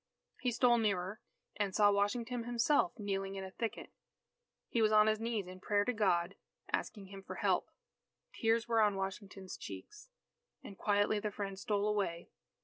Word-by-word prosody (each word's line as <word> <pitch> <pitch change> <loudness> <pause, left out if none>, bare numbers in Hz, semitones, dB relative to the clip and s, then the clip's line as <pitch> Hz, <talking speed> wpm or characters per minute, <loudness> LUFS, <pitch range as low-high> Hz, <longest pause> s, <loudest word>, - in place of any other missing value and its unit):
He 250 - 0
stole 240 0 +4
nearer, 200 -2 -1 0.4
and 200 -2 -1
saw 205 -1 +6
Washington 230 +4 0
himself, 245 +8 +2
kneeling 195 -2 -2
in 195 - -4
a 190 - -7
thicket. 230 +2 -4 0.8
He 235 - 0
was 215 -1 +4
on 215 0 +7
his 215 0 +2
knees 225 -3 -1
in 185 +1 -10
prayer 205 +1 +1
to 250 - +1
God 190 -4 +2 0.4
asking 195 -4 -2
Him 195 0 -9
for - - -8
help. - - +1 0.6
Tears 225 0 +1
were 230 -1 +3
on 210 -2 +3
Washington's 195 0 -5
cheeks. 420 +4 -9 0.5
And 200 - -9
quietly 205 +2 +2
the 210 0 -2
Friend 195 -1 -5
stole 205 0 0
away. 195 -5 -1
205 Hz, 165 wpm, -34 LUFS, 195-225 Hz, 0.8 s, on